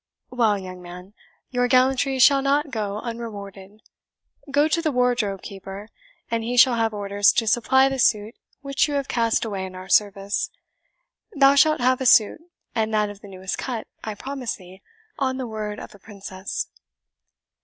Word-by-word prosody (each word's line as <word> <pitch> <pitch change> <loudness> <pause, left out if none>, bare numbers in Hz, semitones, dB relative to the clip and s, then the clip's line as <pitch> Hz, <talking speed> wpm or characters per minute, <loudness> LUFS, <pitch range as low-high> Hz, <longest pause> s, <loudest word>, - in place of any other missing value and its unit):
"Well, 230 -5 +2
young 185 -2 -8
man, 180 +2 -11 0.4
your 245 -1 +1
gallantry 260 +2 +2
shall 275 +2 +6
not 280 +1 +1
go 210 -3 -3
unrewarded. 205 -3 -8 0.7
Go 290 +2 +3
to 335 +2 0
the 315 -2 0
wardrobe 245 -6 0
keeper, 195 +2 -9 0.4
and 230 -1 0
he 245 +2 -2
shall 250 +1 +7
have 225 -1 +1
orders 205 -1 +2
to 230 - +1
supply 255 +4 +3
the 270 -1 -3
suit 215 -2 +2 0.3
which 275 +1 +1
you 290 - -3
have 280 -2 -1
cast 230 -1 +1
away 200 -4 -4
in 185 -1 -7
our 185 +1 -9
service. 200 -1 +1 0.9
Thou 275 0 +6
shalt 305 0 +4
have 255 +1 +2
a 260 - +1
suit, 220 +6 +5 0.3
and 220 -1 0
that 210 -1 +1
of 205 0 -14
the - - -12
newest 190 -1 -5
cut, 240 -4 -4 0.2
I 215 -1 -4
promise 265 +1 -4
thee, 185 0 -15 0.4
on 260 -2 0
the 260 - -3
word 215 -2 -5
of - - -10
a 205 - -16
princess." 195 -2 -6
225 Hz, 175 wpm, -23 LUFS, 200-260 Hz, 0.9 s, shall